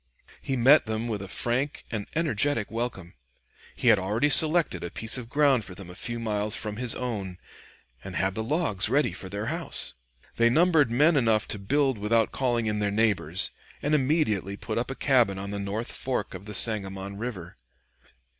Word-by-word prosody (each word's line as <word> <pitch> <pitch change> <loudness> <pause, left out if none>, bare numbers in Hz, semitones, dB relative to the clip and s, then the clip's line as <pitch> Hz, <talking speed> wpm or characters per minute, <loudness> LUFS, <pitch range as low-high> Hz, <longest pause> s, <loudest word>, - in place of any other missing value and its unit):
He 135 - -2
met 130 +2 +5
them 110 +1 -3
with 105 -4 -3
a 100 - -7
frank 125 +8 0
and 105 -3 -4
energetic 145 -7 0
welcome. 110 -7 -4 0.6
He 125 - +1
had 110 -3 +5
already 110 +10 0
selected 160 +4 +4
a - - -4
piece 110 0 -3
of 120 -2 -6
ground 140 -4 +3
for 90 - -11
them 90 -2 -10
a - - -11
few 120 +5 -5
miles 105 -2 -1
from 105 -1 -4
his 125 -1 -1
own, 100 -8 -4 0.7
and 95 -1 -8
had 95 0 0
the 110 - -3
logs 110 - 0
ready 145 +4 +2
for 95 - -8
their 100 +2 -4
house. 165 - 0 0.4
They 115 0 +4
numbered 160 -1 +3
men 150 +8 +3
enough 115 -5 +2
to 105 - -3
build 135 +3 0
without 110 +2 +1
calling 120 -3 -1
in 105 -1 -1
their 105 -1 0
neighbors, 100 -5 0 0.3
and 150 - -2
immediately 130 - 0
put 110 +2 -3
up 120 - -3
a 135 - -4
cabin 120 -10 +2
on 100 +1 -6
the 100 - -4
north 100 +4 -4
fork 125 -5 -3
of 100 - -10
the 105 - -4
Sangamon 100 -3 +3
River. 100 - -7
115 Hz, 190 wpm, -26 LUFS, 100-135 Hz, 0.7 s, met